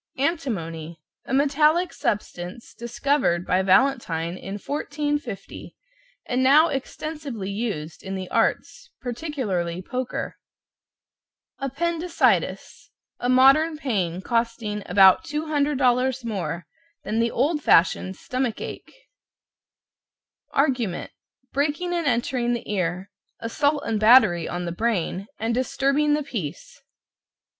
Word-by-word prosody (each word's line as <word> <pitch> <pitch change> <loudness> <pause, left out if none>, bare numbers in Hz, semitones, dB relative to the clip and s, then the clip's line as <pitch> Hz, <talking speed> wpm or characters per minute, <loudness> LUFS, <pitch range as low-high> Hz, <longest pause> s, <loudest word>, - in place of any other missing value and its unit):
=ANTIMONY= 170 - -2 0.3
A - - -5
metallic 300 +5 +3
substance 190 +1 -4
discovered 240 -6 0
by 185 - +2
Valentine 185 -5 +2
in 195 +2 -7
1450, 290 -1 -4 0.5
and 250 +1 0
now 295 +5 +6
extensively 275 -6 -5
used 195 -8 -4
in 195 0 -5
the 185 -1 -5
arts - - 0
particularly 235 - -3
poker. 250 +6 -4 1.2
=APPENDICITIS= 335 +5 0 0.3
A 245 - -1
modern 275 +5 +5
pain, 190 - -1
costing 230 -3 -1
about 190 -2 +6
$200 275 -4 +1
more 190 -5 -3 0.4
than 220 +2 -1
the 230 0 +2
old 295 +7 0
fashioned 185 0 +3
stomach 255 +1 -3
ache. - - -7 1.6
=ARGUMENT= 250 - 0 0.4
Breaking 300 +5 0
and 340 -3 -1
entering 240 0 +1
the 240 - -4
ear, 185 0 -2 0.3
assault 285 +5 0
and 220 -2 0
battery 215 -7 +6
on 175 0 -3
the 170 - -3
brain 195 -1 -1
and 225 +1 -1
disturbing 275 +4 +1
the 300 - -2
peace. 210 - -6
240 Hz, 105 wpm, -24 LUFS, 190-285 Hz, 1.6 s, now